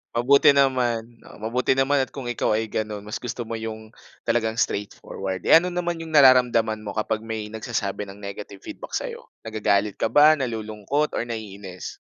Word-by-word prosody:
Mabuti 140 +4 +5
naman, 120 -4 +1
oh, - - -13
mabuti 120 +4 0
naman 135 +2 +2
at 130 - -2
kung 130 -4 -4
ikaw 110 - 0
ay 110 0 -2
gano'n 105 -1 -3
mas 105 +1 -5
gusto 120 0 -5
mo 115 0 -5
yung, 110 -1 -7 0.3
talagang 110 -1 0
straightforward. 95 -3 -3
Eh, - - +7
ano 180 - -3
naman 175 -1 -2
yung 160 -1 -5
nararamdaman 125 -5 +5
mo 105 -1 -7
kapag 110 0 -1
may 110 -1 -5
nagsasabi 110 -2 -3
ng 100 +1 -11
negative 100 0 -8
feedback - - -7
sa'yo? - - -5 0.2
Nagagalit 105 -2 0
ka - - +2
ba, 155 +1 +6
nalulungkot 115 +4 -2
or - - -2
naiinis? 100 -5 -7
115 Hz, 175 wpm, -24 LUFS, 105-130 Hz, 0.3 s, Eh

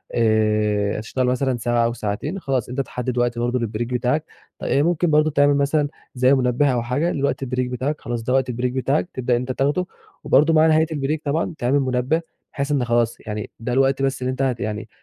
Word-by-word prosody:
آآ، 105 -2 +2
هتشتغل 125 +4 -2
مثلًا 130 0 0
ساعة 120 0 +1
أو 115 - 0
ساعتين 120 - -3
خلاص، 135 - -2
أنت 130 +3 -1
تحدد 125 0 -4
وقت 120 -1 0
برضه 120 +1 0
للبريك 115 0 -3
بتاعك 125 +5 0 0.4
آآ 140 - +1
ممكن 175 +1 +1
برضه 155 0 +3
تعمل 145 0 +4
مثلًا 145 +1 +1 0.3
زي 130 +2 +4
منبّه 125 +1 +2
أو 120 - 0
حاجة 140 +9 0
لوقت 140 -1 -1
البريك 125 -1 -1
بتاعك 130 +5 -3
خلاص 120 -1 -4
ده 125 - -1
وقت 130 -1 +2
البريك 125 +1 -1
بتاعك 135 +6 0
تبدأ 125 -1 0
ان - - +1
أنت 125 +1 -3
تاخده، 145 +8 0 0.4
وبرضه 150 +3 +4
مع 160 0 +5
نهاية 160 0 +4
البريك 150 0 -1
طبعًا 155 +4 -1
تعمل 130 +4 +1
منبّه 130 +4 0 0.3
بحيث 140 0 -2
إن 135 -4 +1
خلاص 120 0 +1
يعني 105 -1 -4
ده 120 +2 -3
الوقت 135 +1 +2
بس 135 -1 0
اللي 130 0 -1
أنت 130 - -4
ه 130 -2 +1
يعني 105 +1 -4
130 Hz, 210 wpm, -22 LUFS, 120-145 Hz, 0.4 s, مع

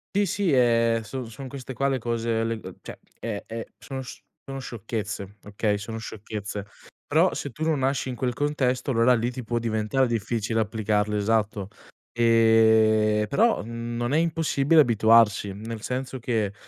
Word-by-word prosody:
Sì, 205 0 +3
sì, 195 0 0
ehm, 115 -2 +3
son 115 +2 -6
son 130 +4 -8
queste 130 -1 -7
qua 135 +3 0
le 130 -1 0
cose, 115 -1 -1
le, 115 - -1
ehm, - - -10
cioè - - -9 0.2
e 105 -3 -4
e 115 0 -6
sono 135 -1 -6
sc 125 - -10 0.2
sono 135 0 -6
sciocchezze, 105 -4 -5
okay, 105 0 -1
sono 110 +2 -6
sciocchezze. 105 -1 -6 0.4
Però 165 +5 +3
se 140 - -4
tu 155 +6 -6
non 155 -3 +1
nasci 135 0 0
in 125 - -3
quel 125 0 -1
contesto, 135 -2 0
allora 115 +1 +4
lì 120 +1 +1
ti 125 0 -6
può 120 +1 -1
diventar 115 +3 0
difficile 115 0 -1
applicarlo 105 -1 0
esatto. 105 -2 0 0.5
Ehm, 110 -2 +4
però 225 - +2
non 120 +2 -3
è - - +4
impossibile 160 -2 +3
abituarsi, 110 -4 +4
nel 110 +2 -7
senso 130 +1 -4
che, 110 -4 -1
115 Hz, 165 wpm, -25 LUFS, 110-130 Hz, 0.5 s, allora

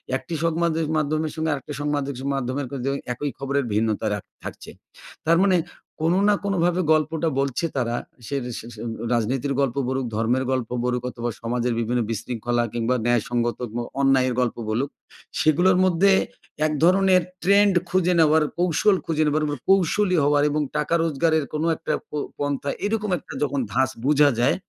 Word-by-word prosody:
১ 130 - -2
টি 170 - -3
সংবাদের 165 -1 +1
মাধ্যমের 155 +1 0
সঙ্গে 160 0 -1
আরেকটি 145 +1 -6
সংবাদের 145 -1 -1 0.2
মাধ্যমের 135 +1 -2
কিন্তু 135 -1 -3 0.2
একই 145 +3 -3
খবরের 140 0 -1
ভিন্নতা 110 0 0
রাখ 105 - -4 0.2
থাকছে। - - -8 0.6
তার 165 +1 +5
মানে 185 -2 +4 0.4
কোনো 165 +3 +2
না 210 - +5
কোনোভাবে 180 -2 +1
গল্পটা 155 +1 0
বলছে 140 +4 0
তারা। 120 -2 0 0.3
সের 140 -3 -2
সে - - -8
সে - - -10 0.3
রাজনীতির 125 +4 0
গল্প 130 -4 0
বলুক, 130 0 -1
ধর্মের 120 +4 +1
গল্প 130 -3 -1
বলুক 125 0 -1
অথবা 120 -1 -4
সমাজের 120 +1 -1
বিভিন্ন 120 +2 0
বিশৃঙ্খলা 120 +2 -1
কিংবা 120 +2 0
ন্যায়সঙ্গত 120 0 0
গ - - -9 0.3
অন্যায়ের 130 -2 +3
গল্প 125 -2 0
বলুক, 125 +6 0 0.5
সেগুলোর 175 +4 +4
মধ্যে 185 +2 +4 0.5
এক 155 - 0
ধরনের 185 +1 +5 0.2
ট্রেন্ড 200 +1 +5 0.2
খুঁজে 180 -1 +2
নেওয়ার, 155 0 +5
কৌশল 180 +3 +3
খুঁজে 155 -1 +1
নেওয়ার 155 +1 +1
ম - - -1 0.2
কৌশলী 195 0 +3
হওয়ার 145 0 +3
এবং 150 +1 0 0.2
টাকা 150 +2 -1
রোজগারের 160 0 +1
কোনো 155 +2 0
একটা 155 -1 -3 0.2
প - - -66 0.3
পন্থা 145 0 -2 0.2
এরকম 210 -1 -1
একটা - - -11
যখন 140 -1 -1
ধাছ 130 0 +2 0.2
বোঝা 145 0 +5
যায়, 125 +3 +3
145 Hz, 165 wpm, -23 LUFS, 125-165 Hz, 0.6 s, তার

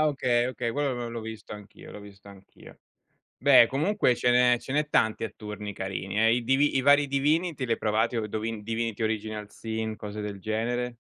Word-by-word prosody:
ah, - - +4
okay, 125 -4 +1
okay, 125 -2 -3
quello 145 +2 -1
l - - -4
l'ho 120 -1 -4
l'ho 115 0 -5
visto 110 -1 -8
anch'io, 105 0 -12
l'ho - - -9
visto 100 0 -14
anch'io. 100 -1 -16 0.6
Beh, 130 -3 +7
comunque 155 -1 +1
ce 125 +1 +2
n'è 125 0 +4
ce 130 - -9
n'è 150 0 0
tanti 110 -5 +1
a 110 - -3
turni 105 -1 -7
carini, 95 +2 -4
eh. 115 +1 +4
I 120 - -2
Divi 135 +4 +2
i 130 - +2
vari 145 +1 +5
Divinity, 150 +2 0
li 115 - -4
hai - - -3
provati 110 +3 0
Do 110 -2 -1
Divin 110 0 -4
Divinity 115 0 -3
Original 110 -1 -3
Sin, 110 -1 -4
cose 105 0 -7
del 105 -1 -6
genere? 120 +4 -2
115 Hz, 210 wpm, -27 LUFS, 105-130 Hz, 0.6 s, Beh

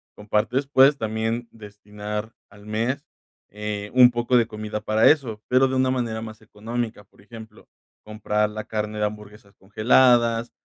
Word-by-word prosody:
compartes 105 +6 -1
puedes 140 +1 +5
también 110 +1 -3
destinar 105 0 -8 0.2
al 100 0 -17
mes, 115 +7 -2 0.5
eh, 105 0 -5
un 125 -1 +7
poco 120 +1 +1
de 115 - +2
comida 105 -1 -6
para 110 +1 +3
eso, 115 -8 -2
pero 130 +1 +4
de 130 - -3
una 130 0 +2
manera 115 -3 -2
más 110 -1 -9
económica, 110 +1 -6
por 100 - -25
ejemplo, 110 0 -13 0.4
comprar 105 0 -1
la 110 0 -6
carne 105 -1 -4
de 105 - +1
hamburguesas 105 -1 -9
congeladas 115 +3 +2
110 Hz, 150 wpm, -23 LUFS, 105-120 Hz, 0.5 s, un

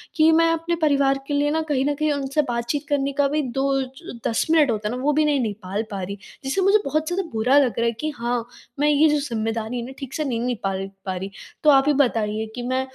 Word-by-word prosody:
कि 315 0 +5
मैं 330 +1 +4
अपने 330 +1 -1
परिवार 275 -2 +3
के 290 - -2
लिए 290 +1 +2
ना 320 - +1
कहीं 270 -2 +1
न 290 0 +1
कहीं 305 +1 0
उनसे 280 +1 0
बातचीत 240 +5 -2
करने 280 -1 0
का 280 - +3
भी 300 +2 0 0.2
2 270 0 +1
ज 260 0 -10
10 225 - 0
मिनट 300 -6 +5
होता 210 -1 -2
है 245 - -3
ना 255 - -5
वो 295 - +2
भी 305 +1 +3
नहीं 290 -2 +2
निकाल 205 -2 -3
पा 195 -2 -4
रही, 200 +2 -5 0.3
जिससे 275 +8 0
मुझे 395 +3 +5
बहुत 310 +2 0
ज़्यादा 375 +2 -1
बुरा 245 +6 +3
लग 250 -7 +1
रहा 235 - +2
है 235 - +2
कि 310 - -1
हाँ, 235 0 -1 0.3
मैं 295 - +3
ये 300 +1 +5
जो 300 - +2
ज़िम्मेदारी 225 -3 -3
है 235 - -5
ना 260 - -8
ठीक 270 -1 -7
से 310 - -1
नहीं 245 -5 -1
निकाल 195 -6 -2 0.2
पा 190 -1 -2
रही। 190 +2 -5 0.3
तो 305 - +6
आप 270 -2 +6
ही 295 - +4
बताइए 220 -5 +1
कि 245 - -4
मैं, 260 +1 +1
270 Hz, 260 wpm, -23 LUFS, 230-295 Hz, 0.3 s, तो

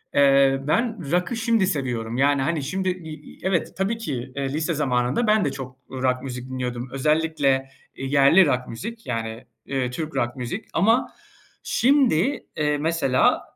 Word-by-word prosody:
eee, 135 -1 +5
ben 215 - 0
rock'ı 180 +7 +1
şimdi 230 -4 +2
seviyorum, 120 -8 -2
yani, 140 +1 +3
hani, 155 +1 -1
şimdi 185 +6 -1
i 175 -4 -5 0.2
i - - -20
evet, 185 -3 0
tabii 195 +4 0
ki, 135 - -5
eee, 140 -1 -2
lise 155 +3 0
zamanında 135 - 0
ben 215 -2 +3
de 145 - 0
çok 130 -2 -7 0.2
rock 130 -1 -1
müzik 125 -1 -6
dinliyordum. 125 -1 -4
Özellikle, 145 -2 +1 0.3
eee, 135 - -6
yerli 140 +7 +5
rock 125 -4 0
müzik, 225 - -7
yani, 115 -1 -4 0.2
eee, 130 -2 -1
Türk 155 +3 -5
rock 120 -2 -1
müzik. 130 - -5
Ama 225 +8 +2 0.5
şimdi, 265 - +2
eee, 150 -1 +1
mesela 155 -4 +2
145 Hz, 160 wpm, -23 LUFS, 130-180 Hz, 0.5 s, eee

